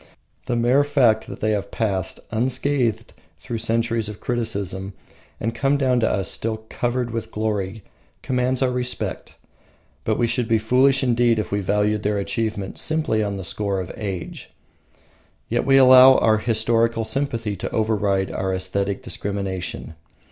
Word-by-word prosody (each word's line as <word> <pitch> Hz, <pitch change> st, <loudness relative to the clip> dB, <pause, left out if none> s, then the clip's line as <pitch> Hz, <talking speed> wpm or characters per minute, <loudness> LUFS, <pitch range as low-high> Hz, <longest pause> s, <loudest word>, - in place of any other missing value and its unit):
The 125 Hz, -, 0 dB
mere 120 Hz, +4 st, +3 dB
fact 130 Hz, -7 st, +2 dB
that -, -, -9 dB
they 110 Hz, -, +1 dB
have 100 Hz, -1 st, -2 dB
passed 95 Hz, -4 st, -2 dB
unscathed 125 Hz, 0 st, 0 dB, 0.3 s
through 115 Hz, -, -5 dB
centuries 115 Hz, -1 st, 0 dB
of 105 Hz, -, -8 dB
criticism 100 Hz, -5 st, -3 dB, 0.5 s
and 115 Hz, +2 st, -2 dB
come 135 Hz, +4 st, +1 dB
down 130 Hz, -3 st, +2 dB
to 110 Hz, -, +2 dB
us 95 Hz, -4 st, -1 dB
still 110 Hz, -1 st, -2 dB
covered 120 Hz, 0 st, -1 dB
with 115 Hz, -1 st, -4 dB
glory 105 Hz, -2 st, -3 dB, 0.4 s
commands 125 Hz, 0 st, 0 dB
our 130 Hz, -, +1 dB
respect. 125 Hz, 0 st, -3 dB, 0.7 s
But -, -, 0 dB
we 120 Hz, -, +2 dB
should 120 Hz, 0 st, -1 dB
be 115 Hz, -1 st, +3 dB
foolish 130 Hz, +5 st, +3 dB
indeed 120 Hz, -2 st, +3 dB
if 110 Hz, -, -3 dB
we 100 Hz, -, 0 dB
valued 105 Hz, +2 st, +1 dB
their 105 Hz, 0 st, 0 dB
achievement 100 Hz, -1 st, -3 dB
simply 155 Hz, -9 st, 0 dB
on 100 Hz, -1 st, -3 dB
the 95 Hz, -, -6 dB
score 100 Hz, +1 st, -2 dB
of 90 Hz, -, -5 dB
age. 95 Hz, -5 st, -6 dB, 1.0 s
Yet -, -, 0 dB
we 135 Hz, 0 st, +6 dB
allow 130 Hz, 0 st, +8 dB
our 110 Hz, -1 st, +3 dB
historical 115 Hz, 0 st, +1 dB
sympathy 115 Hz, -6 st, -2 dB
to -, -, -4 dB
override 105 Hz, -3 st, 0 dB
our 95 Hz, 0 st, -2 dB
aesthetic 95 Hz, +2 st, -2 dB
discrimination. 100 Hz, -5 st, -4 dB
110 Hz, 155 wpm, -22 LUFS, 100-125 Hz, 1.0 s, allow